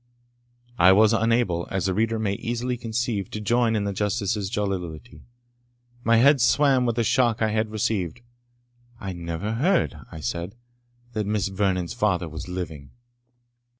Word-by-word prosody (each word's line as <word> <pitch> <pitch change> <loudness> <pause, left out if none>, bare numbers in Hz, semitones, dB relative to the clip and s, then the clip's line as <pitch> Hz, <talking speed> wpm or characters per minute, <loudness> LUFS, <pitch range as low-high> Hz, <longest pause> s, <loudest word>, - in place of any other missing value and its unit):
I 90 +2 +7
was 110 +2 +5
unable, 115 -6 +1
as 95 -1 -2
the 95 - +1
reader 115 +3 0
may 105 -3 -1
easily 120 +4 -2
conceive, 115 -4 -2
to 105 - -5
join 115 +1 +2
in 105 - 0
the 100 0 -2
Justice's 100 0 -1
jollity. 95 -2 -4 0.8
My 115 +1 +4
head 140 +3 +5
swam 130 0 +3
with 115 - 0
the 115 - +1
shock 120 -1 +2
I 110 -1 +1
had 110 0 0
received. 105 -3 -2 0.8
"I 95 -1 -5
never 85 +4 -4
heard," 165 - +1 0.2
I 80 - -8
said, 85 +5 -4 0.6
"that 105 -2 -2
Miss 105 -2 0
Vernon's 95 -3 -1
father 100 -7 0
was 80 +2 -7
living." 80 -6 -6
105 Hz, 150 wpm, -24 LUFS, 95-115 Hz, 0.8 s, I